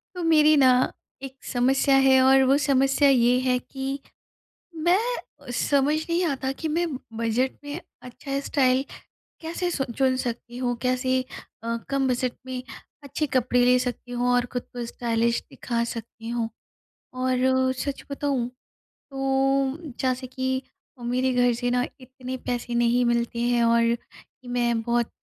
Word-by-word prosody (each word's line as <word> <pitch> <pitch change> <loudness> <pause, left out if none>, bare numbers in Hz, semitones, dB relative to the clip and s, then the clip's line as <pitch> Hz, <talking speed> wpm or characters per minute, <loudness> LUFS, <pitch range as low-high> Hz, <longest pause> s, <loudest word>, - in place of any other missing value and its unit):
तो 355 - -4
मेरी 310 -2 +5
न - - +6 0.6
एक 270 -1 -7
समस्या 265 +2 +2
है 265 0 +6
और 265 +1 +6
वो 270 +2 +4
समस्या 275 0 +3
ये 250 -2 +4
है 255 -1 +2
कि 270 +2 -5 0.9
मैं 355 +2 +5 0.6
समझ 285 +1 +2
नहीं 340 +2 +1
आता 270 -4 -1
कि 320 - -1
मैं 335 +3 0 0.3
बजट 230 +3 0
में 290 +4 -5 0.2
अच्छा 275 +3 -5
स्टाइल 260 -1 +2 0.6
कैसे 340 +2 -2
सु 275 - -1
चुन 265 -1 +3
सकती 240 -1 -4
हूँ, 245 -1 -1
कैसे 255 0 +1 0.4
अ, 230 0 -1
कम 275 -1 +1
बजट 250 -1 0
में 255 -1 -4 0.4
अच्छे 285 +2 -2
कपड़े 250 0 +3
ले 250 0 +5
सकती 245 0 -4
हूँ 245 0 0
और 245 0 +3
खुद 245 - -1
को 245 -1 -4
स्टाइलिश 235 0 0
दिखा 235 -1 -2
सकती 230 0 -8
हूँ। 235 -1 -1 0.6
और 260 0 +2
सच 280 +1 -4
बताऊँ 280 -4 -1 0.4
तो 270 0 0 0.2
जैसे 255 0 -1
कि 260 +1 -2 0.4
मेरे 255 +2 0
घर 245 0 +3
से 245 +1 -2
न 245 0 +2
इतने 255 0 -7
पैसे 240 -1 -3
नहीं 240 +1 +3
मिलते 235 0 0
हैं 240 0 +2
और 230 0 +3 0.5
मैं 240 -2 +1
बहुत 235 0 0
255 Hz, 145 wpm, -25 LUFS, 245-270 Hz, 0.9 s, न